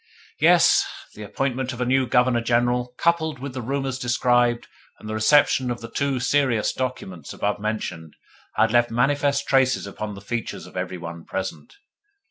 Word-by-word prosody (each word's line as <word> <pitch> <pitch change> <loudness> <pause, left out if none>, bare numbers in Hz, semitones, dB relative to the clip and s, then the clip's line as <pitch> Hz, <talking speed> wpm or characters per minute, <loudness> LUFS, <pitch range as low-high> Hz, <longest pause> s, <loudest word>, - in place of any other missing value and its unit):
Yes, - - +5 0.3
the 105 - -11
appointment 130 +4 -2
of 120 - -9
a 125 - 0
new 130 +1 +2
Governor 125 0 +3
General, 120 +1 +1
coupled 160 -3 +1
with 135 +1 -7
the 130 - -4
rumours 135 +1 -3
described 120 -1 +1 0.3
and - - -11
the 110 - -4
reception 125 +3 +3
of 120 -1 -3
the 115 0 -9
two 140 -2 -1
serious 130 -4 +1
documents 95 - -5
above 105 0 -2
mentioned, 95 -7 -4 0.4
had 110 - +3
left 120 0 +3
manifest 140 +3 +1
traces 130 -4 +2
upon 105 +1 -6
the - - -9
features 115 +2 -5
of - - -15
every 90 0 -3
one 85 -1 -8
present. 95 - -6
120 Hz, 165 wpm, -23 LUFS, 110-130 Hz, 0.4 s, Yes